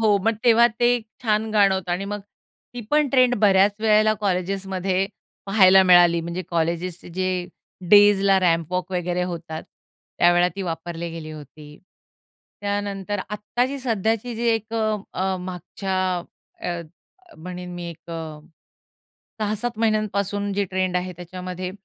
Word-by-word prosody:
हो. 210 -2 +4
मग 225 - +2
तेव्हा 235 0 +6
ते 240 0 +5 0.3
छान 220 -1 +1
गाणं 200 -2 +4
होतं 185 -2 -3
आणि 185 +3 -2
मग 205 - -4 0.5
ती 245 - -5
पण 300 -1 +3
ट्रेंड 255 -1 +4
बऱ्याच 200 0 +5
वेळेला 215 0 +4
कॉलेजेसमध्ये 190 0 -1 0.4
पाहायला 190 -1 +6
मिळाली. 175 -1 +6
म्हणजे 170 +2 -4
कॉलेजेसचे 170 +1 -2
जे 185 0 +1 0.6
डेजला 200 -1 +6
रॅम्प 165 -2 +1
वॉक 180 +1 -2
वगैरे 180 0 -1
होतात, 170 -3 -5 0.6
त्यावेळेला 175 +1 +4
ती 195 - -3
वापरली 170 0 -5
गेली 165 -1 -7
होती. 150 0 -12 0.8
त्यानंतर 205 -1 -3
आत्ताची 245 +6 -2
सध्याची 225 -1 -1
जी 235 +2 -2
एक 225 0 -1
अ, 215 -1 +1 0.2
अ, 190 0 -1
मागच्या 185 +2 -4 0.6
अ, 175 -1 -3 0.6
म्हणेन 180 +2 -7
मी 175 -1 -6
एक 170 +1 -13
अ, 160 -2 -6 1.0
6-7 215 +2 -2
महिन्यांपासून 205 -2 0
जे 200 +1 0
ट्रेंड 185 -1 -1
आहे 180 0 -2
त्याच्यामध्ये, 180 +1 -6
190 Hz, 135 wpm, -23 LUFS, 175-210 Hz, 1.0 s, तेव्हा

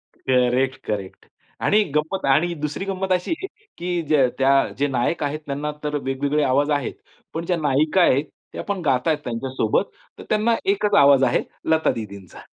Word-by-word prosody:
Correct, 130 +1 +1
correct 100 -3 -5 0.4
आणि 210 +1 +4
गंमत 160 +6 -1
आणि 155 +6 +3
दुसरी 150 +6 -3
गंमत 190 -1 -3
अशी 180 - 0
आहे 385 - -4 0.3
की 175 -1 -2
ज्या 140 -4 +4
त्या 135 +1 +4 0.3
जे 145 +1 +1
नायक 135 +5 -1
आहेत 145 +2 -2
त्यांना 145 +2 -3
तर 150 0 -2
वेगवेगळे 140 +3 0
आवाज 140 +3 +2
आहेत. 145 -3 -1 0.4
पण 165 +1 -4
ज्या 175 -1 0
नायिका 155 +4 +2
आहेत, 140 -2 +3 0.3
त्या - - -5
पण 200 -3 -3
गात 130 -1 +1
आहेत 155 -2 +3
त्यांच्यासोबत. 120 -1 -1 0.4
तर - - -8
त्यांना 215 +2 +2 0.2
एकच 205 +1 0
आवाज 140 -1 +6
आहे, - - +2 0.3
लता 160 0 +3
दीदींचा. 100 -5 -8
145 Hz, 170 wpm, -22 LUFS, 130-175 Hz, 0.4 s, आवाज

